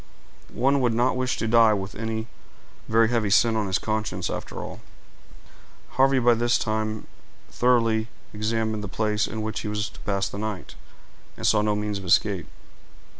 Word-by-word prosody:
One 135 Hz, +3 st, +2 dB
would 120 Hz, -3 st, +1 dB
not 125 Hz, +2 st, +2 dB
wish 130 Hz, 0 st, -1 dB
to 115 Hz, -, -2 dB
die 115 Hz, -1 st, +5 dB
with 95 Hz, 0 st, -5 dB
any 110 Hz, 0 st, -3 dB, 0.6 s
very 115 Hz, 0 st, +4 dB
heavy 115 Hz, -4 st, +1 dB
sin 115 Hz, +2 st, +4 dB
on 110 Hz, -2 st, 0 dB
his 95 Hz, +1 st, +1 dB
conscience, 105 Hz, -5 st, -2 dB
after -, -, -6 dB
all." -, -, -7 dB, 1.1 s
Harvey 135 Hz, 0 st, +3 dB
had 125 Hz, -, 0 dB
by 120 Hz, -, +7 dB
this 120 Hz, +1 st, +2 dB
time 110 Hz, 0 st, -2 dB, 0.5 s
thoroughly 115 Hz, -3 st, +2 dB, 0.3 s
examined 110 Hz, 0 st, -1 dB
the -, -, -4 dB
place 105 Hz, +2 st, 0 dB
in 110 Hz, 0 st, -4 dB
which 110 Hz, 0 st, -3 dB
he -, -, -5 dB
was 105 Hz, +1 st, -2 dB
to -, -, -16 dB
pass 100 Hz, -1 st, -1 dB
the 100 Hz, -, -7 dB
night, 105 Hz, -3 st, -5 dB, 0.6 s
and -, -, -5 dB
saw 105 Hz, -, +4 dB
no 105 Hz, 0 st, +1 dB
means 105 Hz, -1 st, -2 dB
of 95 Hz, -, -9 dB
escape. 95 Hz, +1 st, +2 dB
110 Hz, 175 wpm, -25 LUFS, 105-115 Hz, 1.1 s, by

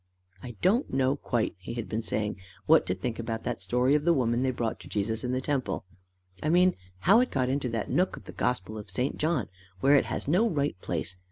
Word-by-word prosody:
"I 120 Hz, +1 st, -8 dB
don't 225 Hz, +9 st, +3 dB
know 135 Hz, +1 st, +2 dB
quite," 120 Hz, -5 st, -1 dB
he 115 Hz, +5 st, -7 dB
had 115 Hz, -2 st, -4 dB
been 110 Hz, +1 st, -2 dB
saying, 105 Hz, -1 st, -2 dB, 0.3 s
"what -, -, +5 dB
to 90 Hz, -, 0 dB
think 115 Hz, +5 st, -4 dB
about 115 Hz, -1 st, -3 dB
that -, -, -3 dB
story 125 Hz, +8 st, +2 dB
of 150 Hz, 0 st, +3 dB
the 170 Hz, +1 st, +4 dB
woman 120 Hz, -2 st, +1 dB
they 130 Hz, -, +2 dB
brought 115 Hz, -3 st, -2 dB
to -, -, -12 dB
Jesus 110 Hz, +2 st, -2 dB
in 125 Hz, -, -1 dB
the 130 Hz, 0 st, 0 dB
temple 130 Hz, -10 st, -2 dB, 0.6 s
I 155 Hz, -, 0 dB
mean 180 Hz, +2 st, +4 dB, 0.3 s
how 205 Hz, +6 st, +6 dB
it 250 Hz, -, +2 dB
got 130 Hz, -2 st, 0 dB
into 135 Hz, -1 st, 0 dB
that 115 Hz, -2 st, -2 dB
nook 185 Hz, +1 st, +1 dB
of -, -, -11 dB
the -, -, -9 dB
gospel 110 Hz, -3 st, -2 dB
of 105 Hz, -, -10 dB
St. 130 Hz, +2 st, -2 dB
John, 155 Hz, -, +1 dB, 0.3 s
where 140 Hz, +8 st, +4 dB
it 140 Hz, -, +4 dB
has -, -, -4 dB
no 190 Hz, +10 st, +3 dB
right 145 Hz, -4 st, 0 dB
place. 95 Hz, -, -3 dB
125 Hz, 235 wpm, -28 LUFS, 115-145 Hz, 0.6 s, how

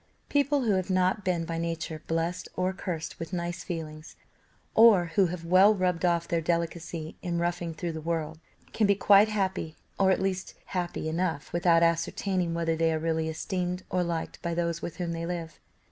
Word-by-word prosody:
People 285 Hz, -1 st, +2 dB
who 225 Hz, -, +2 dB
have 185 Hz, -1 st, 0 dB
not 185 Hz, +2 st, +2 dB
been 175 Hz, -3 st, 0 dB
by 165 Hz, 0 st, -3 dB
nature 165 Hz, -2 st, -3 dB
blessed 165 Hz, +2 st, -2 dB
or 185 Hz, +1 st, 0 dB
cursed 180 Hz, -3 st, -5 dB
with 165 Hz, +1 st, -6 dB
nice 175 Hz, 0 st, -3 dB
feelings, 155 Hz, -2 st, -6 dB, 0.6 s
or 205 Hz, -7 st, +6 dB
who 190 Hz, +1 st, +4 dB
have 170 Hz, -1 st, -6 dB
well 190 Hz, +5 st, +6 dB
rubbed 180 Hz, -3 st, 0 dB
off 170 Hz, -1 st, +1 dB
their 170 Hz, -1 st, 0 dB
delicacy 170 Hz, -1 st, -3 dB
in 175 Hz, -2 st, -2 dB
roughing 170 Hz, -1 st, -2 dB
through 170 Hz, +1 st, -3 dB
the 160 Hz, -1 st, -6 dB
world, 160 Hz, -1 st, -3 dB, 0.3 s
can 215 Hz, -, +2 dB
be 200 Hz, -, +4 dB
quite 205 Hz, +2 st, +6 dB
happy, 190 Hz, -6 st, -2 dB, 0.2 s
or 195 Hz, -1 st, +4 dB
at 190 Hz, -, +3 dB
least 190 Hz, -1 st, -2 dB
happy 175 Hz, -3 st, -3 dB
enough 160 Hz, -2 st, -2 dB
without 170 Hz, -1 st, +4 dB
ascertaining 170 Hz, +1 st, 0 dB
whether 165 Hz, -1 st, 0 dB
they 165 Hz, 0 st, +2 dB
are 160 Hz, -, 0 dB
really 160 Hz, 0 st, -1 dB
esteemed 180 Hz, +2 st, -3 dB
or 180 Hz, -, +1 dB
liked 170 Hz, -2 st, -4 dB
by 170 Hz, -1 st, -2 dB
those 170 Hz, -1 st, -1 dB
with 170 Hz, -, -6 dB
whom 175 Hz, -2 st, -2 dB
they 165 Hz, 0 st, -3 dB
live. 170 Hz, -2 st, -5 dB
170 Hz, 190 wpm, -28 LUFS, 165-185 Hz, 0.6 s, or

